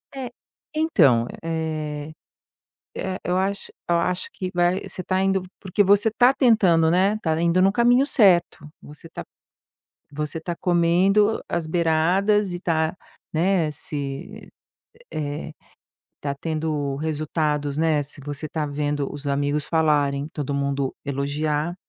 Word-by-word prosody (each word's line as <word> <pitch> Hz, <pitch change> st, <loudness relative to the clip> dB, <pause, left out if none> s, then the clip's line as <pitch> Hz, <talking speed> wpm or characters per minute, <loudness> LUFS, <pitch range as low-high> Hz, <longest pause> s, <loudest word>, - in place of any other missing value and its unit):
É, 260 Hz, -2 st, -5 dB, 0.4 s
então 150 Hz, -, +3 dB, 0.2 s
eh 155 Hz, -2 st, -3 dB, 0.8 s
eh, 190 Hz, 0 st, -3 dB
eu 180 Hz, +1 st, 0 dB
acho 195 Hz, +1 st, -2 dB, 0.2 s
eu 170 Hz, -, +3 dB
acho 180 Hz, +2 st, -1 dB
que 185 Hz, -1 st, -5 dB
vai 175 Hz, +1 st, +2 dB
você 185 Hz, -, -6 dB
tá 185 Hz, +1 st, -1 dB
indo 195 Hz, -1 st, +1 dB, 0.2 s
porque 195 Hz, +1 st, +1 dB
você 205 Hz, +3 st, +4 dB
tá 245 Hz, +4 st, +4 dB
tentando, 190 Hz, -, +4 dB
né, 190 Hz, +5 st, +3 dB
tá 160 Hz, -1 st, 0 dB
indo 170 Hz, +2 st, +3 dB
no 195 Hz, +1 st, +4 dB
caminho 245 Hz, +4 st, +4 dB
certo. 185 Hz, -, +3 dB
Você 150 Hz, +3 st, -13 dB
tá -, -, -8 dB, 0.9 s
você 150 Hz, +2 st, -4 dB
tá 170 Hz, +1 st, -4 dB
comendo 185 Hz, +5 st, +3 dB
as 170 Hz, -2 st, -2 dB
beiradas 180 Hz, +5 st, +2 dB
e 175 Hz, -, -4 dB
tá, 160 Hz, -2 st, 0 dB, 0.4 s
né, 170 Hz, -1 st, +2 dB
se 150 Hz, +8 st, -7 dB, 0.6 s
eh, 145 Hz, -1 st, -4 dB, 0.7 s
tá 140 Hz, -1 st, -2 dB
tendo 155 Hz, -3 st, -2 dB
resultados, 150 Hz, -1 st, -1 dB
né. 160 Hz, -2 st, +2 dB
Se 145 Hz, +1 st, -12 dB
você 145 Hz, +2 st, -5 dB
tá 155 Hz, 0 st, -2 dB
vendo 145 Hz, -1 st, -2 dB
os 145 Hz, 0 st, -7 dB
amigos 145 Hz, +1 st, 0 dB
falarem 150 Hz, -3 st, +1 dB
todo 145 Hz, -2 st, -3 dB
mundo 140 Hz, -1 st, -1 dB
elogiar, 150 Hz, +3 st, -2 dB
160 Hz, 135 wpm, -23 LUFS, 150-185 Hz, 0.9 s, você